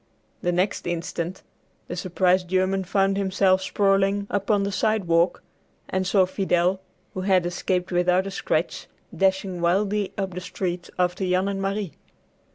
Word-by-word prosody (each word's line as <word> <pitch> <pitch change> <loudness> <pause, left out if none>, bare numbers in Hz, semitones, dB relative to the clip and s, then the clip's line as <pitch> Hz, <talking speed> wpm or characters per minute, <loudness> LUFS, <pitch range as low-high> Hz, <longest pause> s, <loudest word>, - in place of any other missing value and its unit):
The 175 - +1
next 180 +2 0
instant 170 +1 -3 0.4
the 175 - -5
surprised 180 0 +1
German 185 +1 +1
found 195 +1 +1
himself 190 -1 +2
sprawling 195 +1 +2
upon 200 0 +1
the 200 - -1
sidewalk, 180 -5 +1 0.4
and 190 0 -1
saw 190 -1 +4
Fidel, 185 -1 +1 0.3
who 185 - -4
had 185 -2 +3
escaped 180 +1 -1
without 180 +1 +2
a 195 - -4
scratch, - - -2 0.3
dashing 190 -2 0
wildly 195 +3 +1
up 195 -2 -2
the 180 - -5
street 180 -1 -4
after 180 +1 0
Jan 185 +1 +1
and 195 -1 -2
Marie. 195 -3 -2
190 Hz, 145 wpm, -24 LUFS, 180-195 Hz, 0.4 s, saw